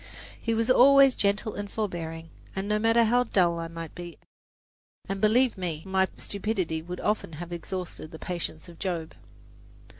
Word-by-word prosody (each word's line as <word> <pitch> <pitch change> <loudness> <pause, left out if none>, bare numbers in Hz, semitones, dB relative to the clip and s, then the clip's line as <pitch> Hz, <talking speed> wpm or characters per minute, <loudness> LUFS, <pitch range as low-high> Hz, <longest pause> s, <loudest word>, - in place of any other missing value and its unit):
He 230 0 0
was 225 0 +1
always 275 +1 +7
gentle 205 +1 0
and 205 0 -5
forbearing, 165 -6 -4 0.3
no 205 +2 0
matter 225 +1 +4
how 245 +2 +3
dull 175 -6 +2
I 165 - -3
might 165 -1 -7
be, 175 -1 -8 0.9
and 195 0 -3
believe 225 0 +3
me, 165 -4 -3
my 190 0 +2
stupidity 190 -6 -2
would 180 +2 -7
often 210 -6 -1
have 175 +3 -7
exhausted 175 -1 -5
the 160 - -9
patience 170 -2 -5
of 170 -2 -13
Job. 170 -4 -3
190 Hz, 155 wpm, -27 LUFS, 165-215 Hz, 0.9 s, always